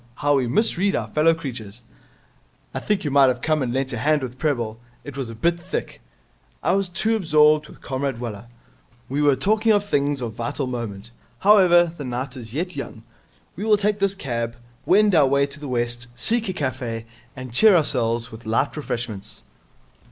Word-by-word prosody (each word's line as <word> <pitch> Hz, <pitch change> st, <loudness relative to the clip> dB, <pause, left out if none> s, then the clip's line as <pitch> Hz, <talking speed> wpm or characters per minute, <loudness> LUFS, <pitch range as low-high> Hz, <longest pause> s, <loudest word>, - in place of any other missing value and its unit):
How 145 Hz, +2 st, +1 dB
we 130 Hz, -2 st, 0 dB
misread 195 Hz, -, +1 dB
our -, -, -2 dB
fellow 160 Hz, +2 st, +3 dB
creatures.' 120 Hz, -7 st, -8 dB, 0.9 s
'I -, -, -2 dB
think 210 Hz, -2 st, -1 dB
you 145 Hz, -, -2 dB
might 140 Hz, -1 st, +6 dB
have 125 Hz, 0 st, -1 dB
come 155 Hz, -2 st, +1 dB
and 125 Hz, -2 st, -1 dB
lent 130 Hz, 0 st, -1 dB
a 120 Hz, -, -3 dB
hand 150 Hz, +2 st, +2 dB
with 125 Hz, 0 st, -7 dB
Prebble. 120 Hz, -8 st, -1 dB, 0.2 s
It 145 Hz, -, -9 dB
was 135 Hz, -4 st, -4 dB
a 115 Hz, -, -8 dB
bit 170 Hz, +8 st, +1 dB
thick.' 185 Hz, +2 st, -5 dB, 0.6 s
'I -, -, +2 dB
was 195 Hz, -1 st, 0 dB
too 215 Hz, +6 st, 0 dB
absorbed 155 Hz, -5 st, +3 dB
with -, -, -16 dB
Comrade 135 Hz, -1 st, -2 dB
Waller. 115 Hz, -2 st, -6 dB, 0.6 s
We 140 Hz, +3 st, -1 dB
were 145 Hz, -2 st, +4 dB
talking 215 Hz, -, +2 dB
of 205 Hz, -1 st, +3 dB
things 145 Hz, -6 st, 0 dB
of 115 Hz, -3 st, -4 dB
vital 140 Hz, +4 st, -3 dB
moment. 115 Hz, -4 st, -5 dB, 0.3 s
However, 175 Hz, -5 st, +5 dB
the 145 Hz, -, -7 dB
night 125 Hz, +1 st, -4 dB
is 115 Hz, -4 st, -8 dB
yet 175 Hz, +7 st, -3 dB
young. 115 Hz, -5 st, -7 dB, 0.5 s
We 195 Hz, -, -5 dB
will 215 Hz, -1 st, +4 dB
take 210 Hz, 0 st, 0 dB
this 200 Hz, 0 st, +1 dB
cab, 115 Hz, -7 st, -3 dB, 0.3 s
wend 205 Hz, +2 st, +5 dB
our 150 Hz, -5 st, +5 dB
way 140 Hz, +1 st, +3 dB
to 140 Hz, +1 st, -9 dB
the 145 Hz, -, -7 dB
West, 120 Hz, -1 st, -1 dB
seek 225 Hz, -, +1 dB
a -, -, -1 dB
cafe, 130 Hz, -7 st, -3 dB, 0.3 s
and 130 Hz, -2 st, -8 dB
cheer 210 Hz, -, +6 dB
ourselves 120 Hz, -6 st, +1 dB
with 110 Hz, 0 st, -11 dB
light 115 Hz, +6 st, 0 dB
refreshments.' 120 Hz, -8 st, -5 dB
140 Hz, 190 wpm, -23 LUFS, 120-175 Hz, 0.9 s, might